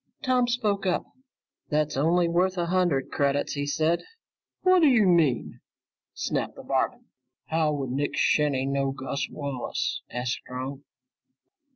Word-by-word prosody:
Tom 255 -3 +2
spoke 210 -5 0
up. 180 - +1 0.7
"That's 150 0 0
only 170 +5 +3
worth 180 +2 +1
a 175 - +1
hundred 175 -6 +1
credits," 140 0 0
he 145 -1 -2
said. 160 +3 +1 0.6
"Whaddya 310 - +5
mean!" 165 -9 +2 0.6
snapped - - -2
the - - -10
barman. - - -1 0.4
"How 160 -1 +2
would 135 -3 -3
Nick 140 +3 -1
Shinny 140 -3 +2
know 135 0 0
Gus 135 0 -3
Wallace?" 140 -4 -3
asked 125 0 -2
Strong. 130 +2 -6
150 Hz, 130 wpm, -26 LUFS, 140-180 Hz, 0.7 s, Whaddya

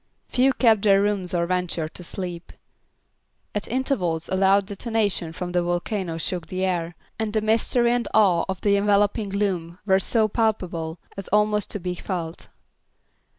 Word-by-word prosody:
Few 260 +2 +3
kept 225 -6 +4
their 195 -2 +5
rooms 200 -3 0
or 170 -2 +1
ventured 175 -3 -2
to 180 - -8
sleep. 175 -1 -6 1.0
At 210 - -3
intervals 220 - -1
a 190 - 0
loud 195 +1 +4
detonation 205 -4 -1
from 175 +2 -5
the 175 0 +2
volcano 175 0 -2
shook 165 0 -3
the 185 +2 -2
air, 175 -2 -2 0.2
and 220 -1 -1
the 215 - +1
mystery 230 +2 +2
and 245 -1 0
awe 190 -6 +4
of 190 -1 -3
the 200 -1 +3
enveloping 205 +1 +2
gloom 185 -4 -2
were 190 -1 +4
so 220 +3 +2
palpable 185 -7 -1 0.2
as 195 - -6
almost 210 0 +2
to 205 - -4
be 180 0 -3
felt. 175 -2 -5
195 Hz, 160 wpm, -24 LUFS, 175-210 Hz, 1.0 s, their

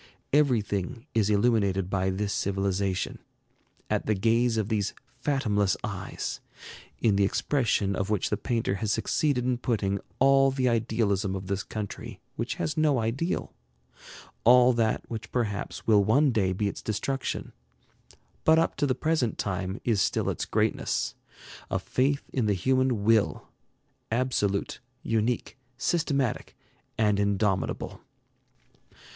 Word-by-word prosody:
Everything 120 -4 +1
is 110 -2 +2
illuminated 100 -3 +2
by 95 0 0
this 100 +2 -1
civilization, 95 -1 -1 0.7
at - - -1
the 110 - +2
gaze 115 +3 +2
of 110 -2 0
these 105 -3 -1 0.2
fathomless 110 -9 +1
eyes, - - -4 0.6
in 105 -4 +2
the 100 - +4
expression 105 -3 +1
of 95 +1 -2
which 105 -4 0
the - - +3
painter 115 -1 -1
has 110 -2 0
succeeded 135 +2 +1
in 125 -1 0
putting 100 -5 0 0.2
all 135 0 +5
the 130 -1 0
idealism 110 -4 +1
of 95 0 -5
this 95 +1 -2
country 105 +1 -6 0.2
which - - -3
has 155 - -2
no 155 -4 +3
ideal; 120 +10 -2 0.9
all 125 +1 +7
that 115 -2 +1
which 115 -1 -6
perhaps 110 -5 -2
will 105 -3 +5
one 135 +7 +4
day 100 -5 +1
be 100 +3 -1
its - - -5
destruction, 135 +5 -3 0.9
but 160 0 +5
up 165 - +2
to 145 +1 +1
the 130 - +1
present 155 -8 0
time 95 +1 -3
is 110 -5 +2
still - - +1
its - - -3
greatness, - - 0 0.6
a - - 0
faith 140 +2 0
in 125 -5 +1
the 100 - +2
human 130 +2 +1
Will, 110 0 +2 0.6
absolute, 110 -5 0 0.2
unique, 115 +3 -1 0.2
systematic, 140 -3 -1 0.4
and 105 -2 +2
indomitable. 100 -1 0
110 Hz, 135 wpm, -27 LUFS, 100-130 Hz, 0.9 s, all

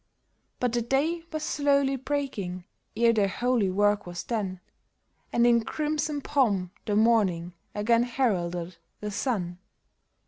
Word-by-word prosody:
But 245 -2 0
the 240 - +1
day 290 +8 0
was 310 -1 -3
slowly 280 -2 +2
breaking 250 -10 -3 0.3
ere 230 0 +5
their 210 -3 +3
holy 240 0 +1
work 205 +1 +2
was 175 0 -5
done, 200 -6 -3 0.7
And 235 - +3
in 235 -1 +4
crimson 300 +2 -2
pomp 205 -12 +1 0.2
the 205 - +1
morning 200 -6 +3 0.2
again 230 +3 +3
heralded 180 -9 -1 0.2
the 210 0 -4
sun. 190 -6 -2
230 Hz, 130 wpm, -27 LUFS, 190-270 Hz, 0.7 s, ere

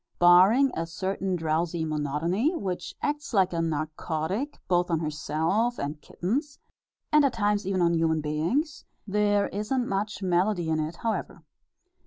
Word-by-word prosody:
Barring 190 +10 +6
a 165 0 -2
certain 190 +2 -2
drowsy 160 0 -1
monotony, 160 - 0
which 185 - -4
acts 295 -4 -2
like 185 -2 +3
a 165 - 0
narcotic 160 - -2
both 175 0 +2
on 165 - +2
herself 160 +9 -1
and 145 +1 -4
kittens, 280 - -3 0.5
and 300 -1 +6
at 275 -3 +2
times 205 -3 0
even 190 -2 +1
on 170 0 +3
human 165 -1 +2
beings, 170 - -1 0.2
there 205 0 +2
isn't 240 +5 -1
much 205 +1 -2
melody 180 -1 +1
in 160 0 +1
it, 155 +2 -3
however. 225 +4 -3
180 Hz, 145 wpm, -27 LUFS, 160-215 Hz, 0.5 s, Barring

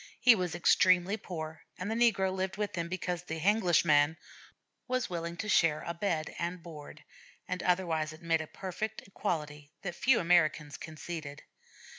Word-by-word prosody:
He 250 -1 +8
was 180 -5 -2
extremely 185 +2 +4
poor, 160 -6 -7 0.2
and 190 +4 -3
the - - +1
negro 220 -5 +3
lived 190 0 -2
with 210 -1 -2
him 170 -1 -2
because 180 -1 -3
the 165 -2 -5
'Henglish 185 -1 +3
man' 150 +1 +4 0.7
was 255 -5 -1
willing 170 0 -4
to 215 - -4
share 165 -6 +3
bed 170 -3 -2
and 170 0 -3
board, 150 -2 -10 0.4
and 180 0 -3
otherwise 170 -4 +1
admit 165 0 0
a 160 - -7
perfect 200 +5 -5
equality 150 -7 -3
that 175 -3 -3
few 240 +7 +3
Americans 155 -4 +2
conceded. 155 -2 -7
175 Hz, 155 wpm, -31 LUFS, 160-190 Hz, 0.7 s, He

